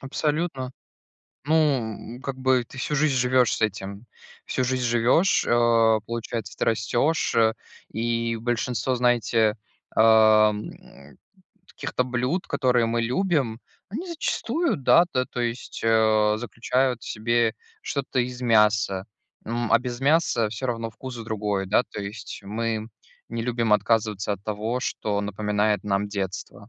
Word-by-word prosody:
Абсолютно. 140 -1 -2 0.7
Ну, 155 +3 +1 0.6
м, - - -13
как 135 -1 -4
бы, 130 -1 +2
ты 125 - -15
всю 150 - -2
жизнь 145 -1 +2
живёшь 125 -1 +3
с - - -6
этим. 100 +1 -3 0.4
Всю 130 - -1
жизнь 130 0 -1
живешь, 120 +10 +3
а, 115 -2 +4
получается, 115 0 -5
ты - - +1
растешь. 120 +8 +1
Э, 110 -1 +4 0.4
и 115 +1 -1
большинство, 120 +2 -1
знаете, 120 -3 +2 0.4
ам, 110 -1 +5 1.0
каких-то 125 - -3
блюд, 125 +8 -1
которые 125 -4 +2
мы 115 +1 0
любим, 125 - 0 0.3
они 285 - -5
зачастую, 335 0 -1
да, 165 +5 +5
та 130 0 +1
то 125 - -4
есть, 120 0 -4
а, 110 -1 +3
заключают 125 +1 -1
в - - -10
себе 115 +1 +1 0.3
что-то 140 -2 -3
из 125 0 -4
мяса. 105 -4 +3 0.4
М, 120 0 -2
а, 115 - +7
без 125 -1 -6
мяса 135 -6 +2
всё 120 +4 -5
равно 115 -2 -3
вкус 130 +3 -8
другой, 105 -3 -2
да 105 +5 +3
то - - -5
есть. 100 +1 -7
Мы 110 +2 -3 0.4
не 115 0 -4
любим 115 -2 0
отказываться 105 -2 +1
от 100 -1 -6
того, 110 +4 -2
что 105 -3 -2
напоминает 105 0 0
нам 100 0 0
детство. 100 +1 -5
115 Hz, 140 wpm, -25 LUFS, 110-125 Hz, 1.0 s, а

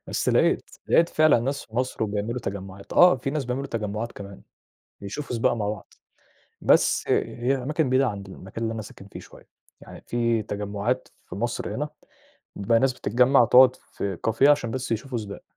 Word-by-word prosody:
بس - - -2
لقيت، - - +2 0.2
لقيت 170 - +4
فعلًا 155 -7 +4
ناس 135 +4 -3
في 110 - -13
مصر 125 -2 -1
وبيعملوا 105 +3 -2
تجمُّعات، 95 -1 -7
آه 180 -4 +6
في 130 +2 -4
ناس 145 -1 -2
بيعملوا 125 +3 -3
تجمُّعات 110 -1 -4
كمان، 100 -1 -10 0.6
يشوفوا 120 +7 -5
سباق 115 - +2
مع 105 -3 -2
بعض، 105 -1 -7 0.7
بس - - +3
هي 125 +3 0
أماكن 150 +1 0
بعيدة 130 +1 +3
عند 100 -3 -5
المكان 95 +4 -8
اللي 115 0 -1
أنا 110 - -4
ساكن 100 -1 -12
فيه - - -10
شوية، - - -16 0.3
يعني - - -12
في 115 -1 +1
تجمُّعات 105 +4 -3 0.2
في - - -9
مصر 120 +4 -3
هنا، 150 +2 -3 0.7
بيبقى 115 +3 +2
ناس 130 +1 +2
بتتجمّع 125 +2 +3
تقعد 125 +2 +6
في 95 -3 -6
Cafe 110 - -1
عشان 145 -6 +3
بس 125 -2 -3
يشوفوا 120 +2 -3
سباق، 100 -2 -8
115 Hz, 175 wpm, -25 LUFS, 105-130 Hz, 0.7 s, آه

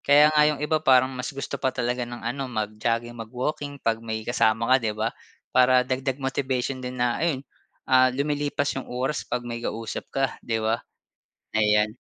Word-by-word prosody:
Kaya 150 +2 +7
nga 150 0 +5
yung 150 -1 -2
iba 155 +1 +1
parang 130 -2 +4
mas 125 0 -4
gusto 140 0 -5
pa 130 - +2
talaga 125 -1 -2
ng 120 -1 -8
ano 130 +2 -2
mag-jogging, 115 +1 -2
mag-walking 130 +5 -4
pag 115 -4 -1
may 110 -1 -4
kasama 115 0 +2
ka, - - +8
'di 110 -2 -2
ba? 110 +1 -1 0.4
Para 125 0 +5
dagdag 130 +1 -1
motivation 130 -1 -1
din 125 0 -5
na 120 -1 0
ayun, 145 -5 0 0.4
ah, 130 0 +5
umilipas 145 0 0
yung - - -7
oras 130 +4 -2
pag 120 0 -2
may 120 -1 -5
kausap 115 -2 -4
ka, 135 0 0 0.2
'di 115 -2 -2
ba. 110 +1 +1 0.8
Ayan. 105 +1 +3
125 Hz, 180 wpm, -25 LUFS, 115-135 Hz, 0.8 s, ka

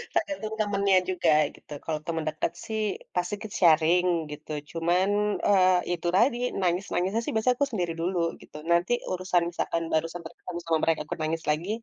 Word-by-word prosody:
tergantung 290 -10 -1
temennya 200 -2 +3
juga 175 -3 +2 0.2
gitu - - -21
kalau 155 -1 -1
teman 165 -2 -1
dekat, 155 0 -2
sih, 220 -1 -2 0.3
pasti 180 +2 -1
ikut 215 -1 -8
sharing 170 +1 +5 0.3
gitu 150 +1 -9 0.2
cuman, 175 +4 +1 0.4
eee, 185 -2 +5 0.2
itu 175 0 -3
tadi 240 +4 +4 0.2
nangis-nangisnya 185 +3 0
sih - - -3
biasanya 245 +3 +3
aku 285 - +3
sendiri 175 -7 -1
dulu 180 +1 0 0.2
gitu. - - -12
Nanti 170 +7 +3 0.2
urusan 180 -1 +1
misalkan 170 -1 -2
baru 160 +1 +2
sempet 170 -1 -8
ketemu 175 -1 -6
sama 165 -1 +2
mereka 160 -2 +2 0.2
nangis 160 +1 -2
lagi 165 +6 -2
180 Hz, 165 wpm, -27 LUFS, 165-200 Hz, 0.4 s, sharing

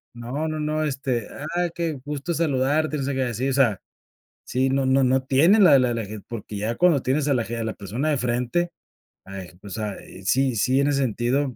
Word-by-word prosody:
No 125 +7 -3
no 155 0 -3
no, 155 +1 -1
este, 135 -6 -2
ah, 175 +4 -2
qué 170 -2 -2
gusto 150 +3 -3
saludarte, 155 0 +1
o 140 - -2
sea, 140 +1 -1
que 135 - -1
decir. 125 +1 -1
O - - -1
sea, 120 -8 +2 0.7
sí, 130 +2 +1
no 135 0 +1
no 135 +1 +3
no 130 +1 +2
tiene 155 +11 +4
la 175 -8 +7
la 125 -1 +1
la 115 -1 -2
ge 105 +1 -8
porque 105 -2 -6
ya 110 +3 -2
cuando 170 -7 +4
tienes 135 +3 0
a 140 - +3
la 120 -3 0
ge 115 +1 -5
a 115 - -2
la 110 - -3
persona 115 +10 -3
de 150 - +2
frente, 125 +8 0 0.6
ah, 95 0 -7 0.2
pues, 100 +1 -7
o - - -3
sea, 105 -1 -2
eh, - - -12
sí 130 +5 +2
sí, 130 +5 +2
en 140 - +2
ese 140 -1 +1
sentido, 130 +2 0
130 Hz, 235 wpm, -24 LUFS, 120-150 Hz, 0.7 s, la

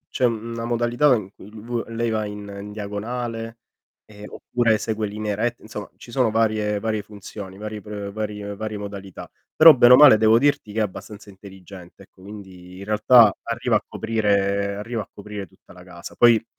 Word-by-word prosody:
c'è 130 - -1
una 115 0 -3
modalità 120 +4 +2
in 100 -4 -5
cui 100 - -14
v 115 +2 -5
lei 115 0 -2
va 110 -1 -1
in 105 0 -7
n 100 0 -9
diagonale, 115 +2 -5 0.5
ehm, 105 -1 -13
oppure 115 -3 0
segue 110 0 -3
linee 105 0 -4
rette 120 +3 -2
Insomma, 105 -1 -8
ci 120 - -13
sono 125 -3 +1
varie 110 -2 0
varie 110 -1 -2
funzioni, 100 -2 -10
vari 105 0 -7
pr 100 -1 -7
varie 105 -1 -5
varie 110 0 -5
modalità. 100 -2 -9 0.3
Però 160 0 +9
bene 120 -2 +6
o - - +11
male 140 -6 +8
devo 110 +1 +4
dirti 140 -5 0
che 110 - -2
è - - +2
abbastanza 105 +1 -6
intelligente, 95 -1 -14
ecco, 95 - -23
quindi 95 -2 -12
in 100 - -9
realtà 110 +1 +5
arriva 115 0 -1
a 105 - -9
coprire 100 -3 -1
arriva 110 +3 -4
a - - -11
coprire 100 -1 -8
tutta - - -21
la 90 -1 -15
casa. 85 -1 -11
Poi 115 -2 +5
105 Hz, 185 wpm, -22 LUFS, 100-115 Hz, 0.5 s, o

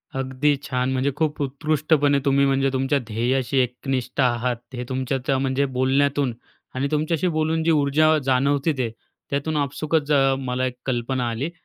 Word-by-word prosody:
अगदी 135 +2 +1
छान! 130 -2 -1
म्हणजे 135 +2 +1
खूप 155 -1 -1
उत्कृष्टपणे 145 0 +1
तुम्ही 140 0 +3
म्हणजे 135 0 +2
तुमच्या 135 +2 +1
ध्येयाशी 125 +4 0
एकनिष्ठ 125 +1 -2
आहात, 120 0 +1 0.2
हे 125 0 -4
तुमच्या 130 0 -1
त्या 135 -1 +2
म्हणजे 135 +1 0
बोलण्यातून 135 0 +2 0.4
आणि 135 +2 0
तुमच्याशी 155 +3 0
बोलून 160 -1 0
जी 165 - +3
ऊर्जा 155 +1 +3
जाणवते 140 +4 +2
ते 125 -3 -1 0.4
त्यातून 145 +2 -1
आपसूकच 145 +2 -1
अ, 135 -1 +4
मला 130 -1 -2
एक 125 -1 -3
कल्पना 125 -1 -1
आली. 125 +8 -3
135 Hz, 155 wpm, -23 LUFS, 130-145 Hz, 0.4 s, अ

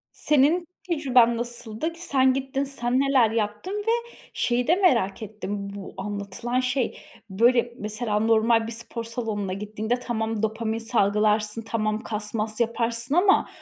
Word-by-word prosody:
Senin 305 +4 +3 0.2
tecrüben 255 -8 +3
nasıldı? 240 +5 -3
K 335 - -14
sen 265 -6 +3
gittin, 270 +1 -2
sen 255 -2 0
neler 270 -5 +4
yaptın 220 - -2
ve - - +3 0.4
şeyi 245 0 0
de 345 - +5
merak 230 - +2
ettim 205 -1 -5
bu 200 -1 -8
anlatılan 205 +5 -3
şey. 255 -1 -1 0.3
Böyle, 235 +3 +3
mesela, 210 0 -2
normal 225 0 +3
bir 230 - -5
spor 230 0 -5
salonuna 220 -4 -3
gittiğinde 215 +4 -2
tamam 225 -3 -2
dopamin 220 0 -1
salgılarsın, 215 0 +1
tamam 215 -1 -1
kas 210 -1 -4
mas 215 +1 -2
yaparsın 235 +2 0
ama 385 +3 +4
230 Hz, 140 wpm, -25 LUFS, 215-250 Hz, 0.4 s, de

